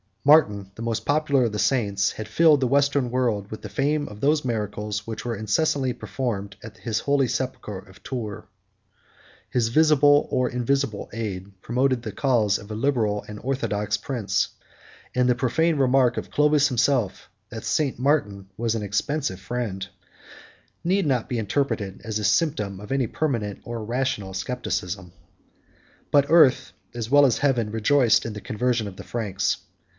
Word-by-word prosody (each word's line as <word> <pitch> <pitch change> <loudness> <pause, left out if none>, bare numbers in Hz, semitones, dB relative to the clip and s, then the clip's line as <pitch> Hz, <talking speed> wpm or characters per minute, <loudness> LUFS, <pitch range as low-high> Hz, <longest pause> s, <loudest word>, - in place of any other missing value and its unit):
Martin, 105 -10 +4
the - - -9
most 115 -1 -2
popular 145 -2 +2
of 115 - -1
the 105 - -4
saints, 100 -7 +1
had 110 - -7
filled 155 +6 +5
the 130 - +1
Western 140 -1 +2
world 115 -5 0
with 110 - -7
the - - -6
fame 145 +1 0
of 105 0 -10
those 145 +3 +2
miracles 105 -2 -3
which 110 -1 -6
were 120 -1 -2
incessantly 125 +5 0
performed 100 -8 -4
at 110 -1 -10
his 110 -1 -2
holy 140 -2 +2
sepulchre 105 -6 -3
of 95 -1 -17
Tours. 110 -6 -5 1.1
His 120 -2 +1
visible 145 +1 +5
or 125 0 +1
invisible 125 -2 -1
aid 100 -3 -6
promoted 130 +1 +1
the 110 -2 -5
cause 110 -5 +2
of 100 - -12
a 105 - -4
liberal 110 -5 0
and 105 0 -8
orthodox 110 -6 -1
prince; 120 -7 -1 0.7
and 125 0 +3
the 125 - +3
profane 155 +6 +1
remark 130 -2 +3
of - - -5
Clovis 150 0 +4
himself, 125 -4 0 0.2
that 110 -2 -7
St.Martin 135 -9 0
was 115 0 0
an 110 - -3
expensive 100 +1 -1
friend, 100 -1 -4
33 100 - -9 0.9
need 190 +2 +1
not 125 -5 0
be 120 - -1
interpreted 105 -3 -2
as 110 -1 -3
the 105 - -4
symptom 105 - +1
of 105 +3 -10
any 135 -3 +1
permanent 115 -8 -2
or 120 -2 -5
rational 115 -4 -2
scepticism. 95 -5 -4 1.0
But 140 -1 +5
earth, 130 - +5 0.2
as 115 -2 -4
well 145 +1 +6
as 125 -5 +2
heaven, 125 -7 +1
rejoiced 115 +2 +3
in 115 - -4
the 105 - -7
conversion 115 0 -1
of 95 -1 -9
the - - -8
Franks. 100 -5 -1
120 Hz, 165 wpm, -24 LUFS, 105-135 Hz, 1.1 s, well